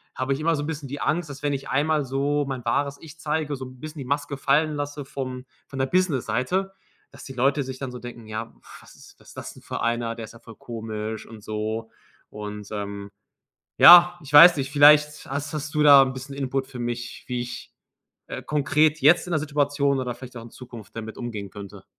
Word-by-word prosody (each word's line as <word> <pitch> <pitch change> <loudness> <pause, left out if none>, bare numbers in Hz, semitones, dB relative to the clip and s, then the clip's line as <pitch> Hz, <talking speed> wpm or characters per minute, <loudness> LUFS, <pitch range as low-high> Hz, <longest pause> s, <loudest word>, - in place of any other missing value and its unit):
habe 130 +1 -1
ich 135 - -4
immer 165 +1 +2
so 145 - -3
'n - - -5
bisschen 150 -4 -5
die 145 - -6
Angst, 160 0 -1
dass 140 +1 -10
wenn 145 -1 0
ich 135 0 -5
einmal 150 +2 +1
so 140 +2 0
mein 130 -3 -5
wahres 140 +4 0
Ich 160 0 -12
zeige, 150 -1 -2
so 130 -1 -7
'n 130 0 -13
bisschen 155 +1 -8
die 135 - -6
Maske 145 +1 -2
fallen 150 +3 +2
lasse 145 0 -5
vom 130 -1 -6 0.2
von 135 - -8
der 130 - +2
Business-Seite, 185 +2 0 0.4
dass - - -13
die 135 - -9
Leute 135 +3 +1
sich 130 0 -7
dann 135 -2 -5
so 125 - -8
denken: 120 -2 -10
„Ja, 110 +1 -6 0.3
was - - -17
ist - - -17
was - - -16
das - - -8
denn - - -17
für - - -5
einer? 115 0 -1
Der 115 - -7
ist - - -14
ja 115 - -15
voll 115 -1 -14
komisch 110 -2 -6
und 110 -2 -12
so.“ 110 +1 -4 0.4
Und, 105 -1 -8
ähm, 100 -1 -6 0.7
ja, 175 0 +9
ich 145 0 -11
weiß 170 +3 +10
nicht, 135 0 -3
vielleicht 150 +1 +5
hast, 145 +1 -4
hast 150 +1 -4
du 150 - +2
da 140 -2 +9
'n 130 0 0
bisschen 135 +1 -8
Input 135 -1 -2
für 125 -2 -8
mich, 120 0 -5
wie 125 -1 -2
ich, 120 -1 -8 0.6
äh, - - -6
konkret 150 +1 +1
jetzt 160 +6 +5
in 175 - -4
der 155 - +2
Situation 145 -2 0
oder 125 -2 -3
vielleicht 130 0 -12
auch 115 - -7
in 115 - -12
Zukunft 120 -5 -12
damit 110 0 -7
umgehen 110 -5 -5
könnte? 100 0 -11
135 Hz, 225 wpm, -24 LUFS, 120-145 Hz, 0.7 s, weiß